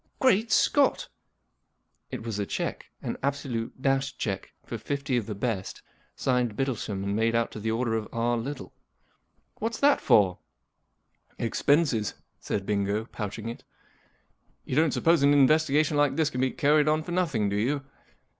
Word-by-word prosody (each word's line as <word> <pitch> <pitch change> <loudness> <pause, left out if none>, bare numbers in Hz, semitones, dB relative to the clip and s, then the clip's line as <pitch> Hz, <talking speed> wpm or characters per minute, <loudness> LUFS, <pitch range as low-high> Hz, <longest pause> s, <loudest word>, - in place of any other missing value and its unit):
*■ - - -49 0.2
Great 225 -4 +3
Scott! - - +3 0.5
" - - -49
It - - -7
was 110 -3 -4
a 100 - -1
cheque—an - - -4
absolute, 130 -4 -3
dashed 135 +1 0
cheque 95 -4 -3
for - - -5
fifty 140 -2 -2
of 120 -4 -1
the 105 - -4
best, 100 -2 -3 0.3
signed 125 -4 0
Bittlesham 115 -7 -2
and 100 +1 -1
made 115 +1 +1
out 115 0 +1
to - - -7
the 110 +1 -2
order 115 +1 0
of 110 -1 -2
R„ 120 +1 0
Little* 130 +4 -5 0.4
" - - -45
What's 225 +1 -2
that 285 +1 +4
for? 95 -4 +4 0.3
" - - -49
" - - -38
Expenses," 140 -5 +1 0.2
said 100 -2 -3
Bingo, 100 +1 0
pouching 110 -1 -6
it. 115 - -7 0.5
" - - -42
You - - -3
don't 160 +1 +4
suppose 165 +1 +3
an 140 +1 +5
investigation 150 +1 +3
like 145 -2 +3
this 160 -1 +1
can 125 - -2
be 130 - +2
carried 150 +2 +3
on 155 +1 +2
for 175 - -7
nothing, 155 - +1
do 100 - -2
you 135 +7 0
125 Hz, 175 wpm, -27 LUFS, 110-145 Hz, 0.5 s, an